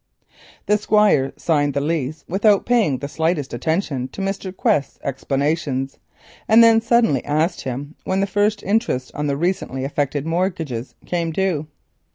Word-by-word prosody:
The 210 0 +2
Squire 210 -11 +3
signed 145 -4 +1
the - - +2
lease 150 0 -2
without 200 +2 +3
paying 225 - +2
the 140 - -5
slightest 160 -1 -1
attention 140 0 -1
to - - -11
Mr. 195 -1 -3
Quest's 145 -6 0
explanations, 140 0 -2 0.5
and 225 +1 +7
then 225 -1 +6
suddenly 230 - +2
asked 155 +4 0
him 135 +4 -5
when 190 +1 -1
the 195 - +2
first 205 +1 0
interest 200 - 0
on 150 0 -2
the 140 -1 0
recently 160 -6 -1
effected 145 +1 -2
mortgages 165 -8 -2
came 170 -2 -1
due. 165 -4 -1
160 Hz, 150 wpm, -21 LUFS, 140-195 Hz, 0.5 s, and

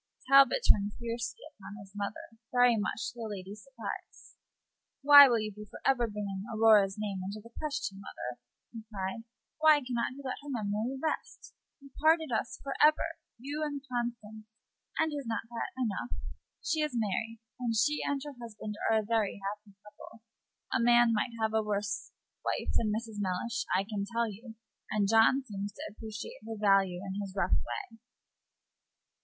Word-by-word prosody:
Talbot 275 - +6
turned 205 0 +4
fiercely 235 0 -4
upon 205 -3 -11
his 195 -2 -13
mother, 205 +2 -6
very 245 -1 +5
much 215 +2 -2
to 240 - -14
the 225 - -3
lady's 200 +1 -7
surprise. 235 -7 -8 0.7
"Why 285 0 +11
will 235 - +3
you 215 0 -3
be 210 +1 -9
for - - -10
ever 250 -3 +3
bringing 205 -2 -4
Aurora's 215 -3 +5
name 205 -3 -3
into 200 +3 -5
the 230 +2 -15
question, 285 -10 -3
mother?" 125 -10 -7 0.3
he 230 - -8
cried. 200 +3 -4 0.3
"Why 310 -1 +7
can 255 -3 -5
not 235 +1 0
you 280 +1 -10
let 260 - -3
her 290 - -9
memory 225 +1 -2
rest? 315 +2 -4 0.3
You 275 -1 -15
parted 320 -2 +4
us 230 +1 -2
for 275 - -3
ever 310 +2 +3 0.2
you 285 +5 -5
and 290 -2 -2
Constance 230 -3 -4 0.5
and 315 -1 +1
is 285 -4 -4
not 225 - -1
that 235 - -3
enough? 245 -1 -2 0.5
She 315 -1 +1
is 300 -4 -1
married, 225 +1 -1 0.2
and 235 -2 -1
she 295 +7 +2
and 285 -1 0
her 290 - -6
husband 215 -2 -7
are 225 - +4
a 215 - +1
very 215 -2 0
happy 205 0 -6
couple. 210 +2 -14 0.5
A - - +3
man 240 0 +5
might 225 +3 0
have 220 0 0
a 220 - +3
worse 205 -1 -2 0.3
wife - - -1
than 215 -2 +1
Mrs. 220 0 -4
Mellish, 225 +6 -1
I 190 - +1
can 200 -1 -3
tell 235 0 +1
you; 220 +2 -9 0.3
and 205 -2 +1
John 225 +5 +5
seems 205 -3 -5
to - - -8
appreciate 215 0 -8
her 225 - -4
value 195 -3 +3
in 195 +1 -3
his 195 -1 -7
rough 185 -2 0
way." 120 - -3
225 Hz, 175 wpm, -31 LUFS, 205-250 Hz, 0.7 s, Why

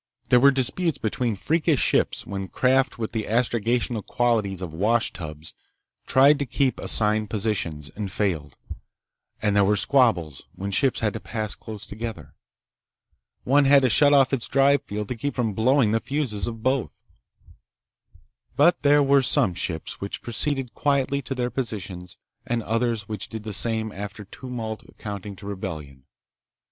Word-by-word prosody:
There 125 - +6
were 140 +3 +7
disputes 140 +4 0
between 115 -1 -2
freakish 155 - +1
ships - - +1
when 95 -1 -5
craft 130 +7 +1
with 110 -2 -4
the 110 -3 -3
astrogational 115 0 0
qualities 110 -6 0
of 85 -4 -6
washtubs 85 -6 -2 0.5
tried 140 +3 +5
to 140 - -2
keep 130 +1 0
assigned 105 -1 +3
positions, 90 -9 -2
and 100 -2 -4
failed, 90 -8 -2 0.9
and 105 -1 +1
there 100 - +5
were 105 +2 +3
squabbles 100 - +1
when 100 +1 -5
ships 130 +6 +2
had 105 -3 0
to - - -5
pass 110 -2 -3
close 105 -2 -9
together. 115 +1 -7 1.1
One 140 +2 +3
had 140 0 +6
to 130 - +3
shut 145 +4 +5
off 140 -1 +4
its 125 -4 -1
drive 140 +1 +3
field 105 0 -5
to 125 - -3
keep 140 +5 -4
from 115 -4 -1
blowing 115 +2 +3
the 115 - +2
fuses 125 -5 -2
of 115 -2 -6
both. 130 -1 -1 1.5
But 170 +4 +4
there 145 0 +4
were 140 0 +4
some 100 -6 +3
ships 80 -2 -4
which 100 - -5
proceeded 135 +1 0
quietly 140 -1 0
to 135 +1 -5
their 125 -1 -2
positions 100 -8 -5 0.3
and 120 -1 -1
others 115 -2 -1
which 105 -3 -4
did 110 -1 -7
the 105 -1 -5
same 110 +1 +1
after 100 +1 -7
tumult 115 -1 -7 0.2
amounting 100 -1 -6
to 100 - -13
rebellion. 75 -9 -7
115 Hz, 155 wpm, -24 LUFS, 100-130 Hz, 1.5 s, were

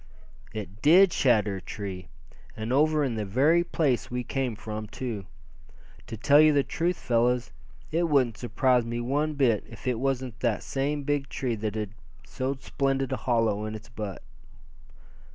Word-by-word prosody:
"It 105 -1 -7
did 180 +4 +6
shatter 105 -6 +2
a - - -8
tree, 95 -3 -6 0.5
and 110 +3 -2
over 155 +2 +3
in 130 -4 0
the 110 -1 -2
very 140 - +3
place 130 -8 0
we 125 0 -3
came 125 -1 -2
from, 110 0 -6
too. 110 -5 -5 0.8
To 115 - -6
tell 145 +7 +6
you 155 -1 +6
the 140 -1 +3
truth, 175 +5 -1
fellows, 120 -5 +1 0.4
it 170 +1 +1
wouldn't 130 -7 +2
surprise 125 +1 +2
me 120 +1 -3
one 145 +5 -1
bit 125 -7 +2
if - - -12
it 125 -3 0
was 135 -1 0 0.2
that 120 -4 0
same 145 +2 -2
big 145 -1 -1
tree 130 -4 -2
that 110 -1 -3
had 105 -3 -3 0.3
so 130 - -3
splendid 135 -1 -1
a - - +1
hollow 115 -4 +1
in 110 0 -4
its 110 0 -10
butt." 105 -4 -6
125 Hz, 170 wpm, -27 LUFS, 110-140 Hz, 0.8 s, did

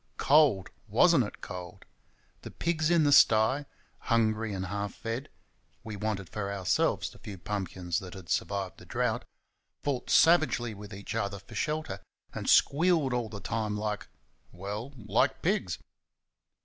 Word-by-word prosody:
Cold! 140 -11 +4 0.2
was - - +5
n't - - +5
it - - -8
cold! 90 -1 -8 0.6
The - - -8
pigs 160 -2 0
in 170 -2 +4
the 145 - +3
sty, 130 +2 +5 0.3
hungry 110 -1 +1
and 95 -1 -3
half 100 +2 -4
fed 115 +4 -4 0.5
(we 110 -2 -6
wanted 100 -2 -3
for 100 +1 -4
ourselves 95 -2 0
the - - -16
few 100 -2 -8
pumpkins 95 -2 -3
that 95 -2 -9
had 95 -3 -10
survived 100 0 -2
the - - -13
drought) - - -1 0.6
fought 135 -4 -2
savagely 145 -9 +4
with 105 0 -10
each 100 +1 -6
other 100 0 -2
for 100 0 -14
shelter, 155 +1 -2 0.3
and - - -3
squealed 155 -3 +4
all 120 -2 -1
the 105 -2 -7
time 105 -1 -2
like 105 0 -3 0.4
well, 105 +8 -6
like 105 -2 0
pigs. - - 0
110 Hz, 150 wpm, -29 LUFS, 100-130 Hz, 0.6 s, was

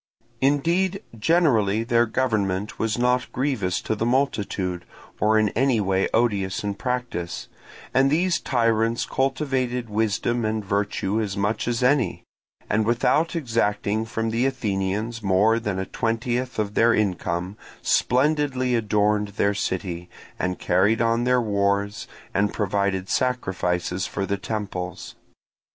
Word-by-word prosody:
Indeed, 170 +8 +1
generally 115 - +2
their 120 0 +2
government 105 -5 -1
was 110 0 0
not 125 0 +1
grievous 115 -9 -1
to - - -2
the 110 - -2
multitude, 105 -8 0 0.4
or 110 +1 +3
in 110 -1 +3
any 130 +1 +2
way 95 -1 +1
odious 100 -5 +1
in 100 -1 -1
practice; 120 -6 -3 0.5
and 135 +1 +4
these 170 +4 +2
tyrants 115 -2 +1
cultivated 130 -3 -1
wisdom 110 +2 0
and 110 -1 -1
virtue 100 +1 0
as 100 -2 -3
much 105 +3 -1
as 120 0 0
any, 130 -1 +2 0.4
and 110 +1 +1
without 125 +9 +2
exacting 110 -6 0
from 115 0 -2
the 120 +4 +2
Athenians 110 -2 -2
more 105 +3 +3
than 105 -4 -3
a 95 - -2
twentieth 120 +4 -2
of 105 -1 -1
their 115 +2 +4
income, 90 -2 -1 0.3
splendidly 130 -1 +2
adorned 105 -2 +2
their 100 0 0
city, 90 -3 -3 0.3
and 90 -1 -1
carried 100 +5 +2
on 115 +1 +2
their 125 0 +3
wars, 100 -2 0 0.3
and 100 +1 +1
provided 100 -2 0
sacrifices 95 -8 -1
for 100 - -3
the 100 +1 -1
temples. 95 -3 -5
110 Hz, 130 wpm, -24 LUFS, 100-125 Hz, 0.5 s, and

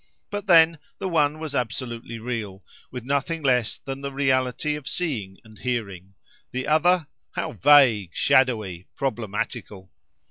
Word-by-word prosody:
But 205 0 -4
then, 165 -3 +6 0.2
the - - -3
one 155 -4 +2
was 155 -2 -6
absolutely 120 -2 -4
real, 110 -5 -5 0.2
with 125 -2 -7
nothing 140 +4 -1
less 125 -4 +2
than 135 0 -7
the 140 0 -4
reality 135 +1 0
of 150 -2 -7
seeing 115 - -3
and 110 -2 -17
hearing—the 110 +1 -6
other, 165 +2 +3 0.3
how 165 - -3
vague, 130 - +5
shadowy, 110 -9 +2
problematical! 105 -5 -4
130 Hz, 130 wpm, -24 LUFS, 110-150 Hz, 0.3 s, then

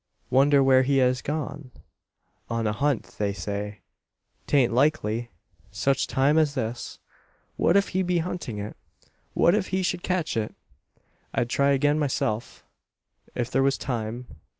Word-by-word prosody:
Wonder 140 +2 +5
where 130 -1 +5
he 135 +1 +2
has 125 -1 +3
gone? 150 -2 -4 0.8
On 115 -1 -1
a 105 - +1
hunt, 140 +2 0 0.2
they 100 -1 0
say. 100 +2 -5 0.7
'Tain't 135 -5 +3
likely, 120 -4 +1 0.4
such 135 -1 0
time 145 +4 +3
as 150 -3 +1
this. 120 -2 -4 0.6
What 175 - +3
if 200 - +2
he 190 - 0
be 180 -1 +1
hunting 170 -9 -3
it? 105 +1 -6 0.6
What 170 - +4
if 205 -2 +1
he 190 0 -1
should 180 0 -1
catch 180 -6 -1
it? 110 -1 -2 0.8
"I'd 120 0 0
try 140 0 +3
again 145 +2 +2
myself, 120 -5 -2 0.7
if 120 0 -2
there 135 - +2
was 135 0 +2
time. 120 -1 -4
135 Hz, 150 wpm, -26 LUFS, 115-150 Hz, 0.8 s, Wonder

